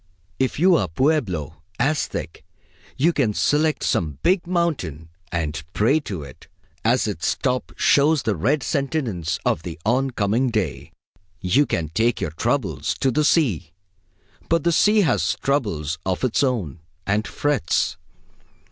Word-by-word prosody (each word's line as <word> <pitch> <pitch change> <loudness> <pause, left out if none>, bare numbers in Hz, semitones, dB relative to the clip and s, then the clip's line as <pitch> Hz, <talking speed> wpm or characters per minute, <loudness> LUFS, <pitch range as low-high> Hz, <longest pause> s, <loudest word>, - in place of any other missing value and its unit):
If 130 -1 0
you 180 +4 +5
are 95 - 0
Pueblo, 90 - -1 0.2
Aztec, 145 0 -1 0.6
you 165 +6 +3
can 115 -9 +1
select 155 +1 +1
some 75 -5 0
big 180 -1 +2
mountain 140 - -1 0.2
and 75 -3 -2
pray 130 +9 +3
to 95 - -6
it, 65 -2 -13 0.4
as - - +2
its - - -1
top 125 0 -1
shows 145 -1 +3
the 110 -2 0
red 135 - +1
sentience 120 - -1
of - - +1
the 85 0 -7
on 130 +4 +2
coming 115 +2 +1
day. 105 - -2 0.5
You 100 +12 +2
can 80 -2 -1
take 115 +8 +1
your 75 - -2
troubles 80 - -1
to 135 - +1
the 150 +5 +1
sea; 105 - +1 0.8
but 165 -2 +2
the 170 - +3
sea 210 +6 +4
has 160 -10 +1
troubles 85 - -1
of 95 +3 -2
its 130 0 +1
own, 115 - -1 0.3
and 105 +1 0
frets. 145 - 0
120 Hz, 145 wpm, -22 LUFS, -, 0.8 s, you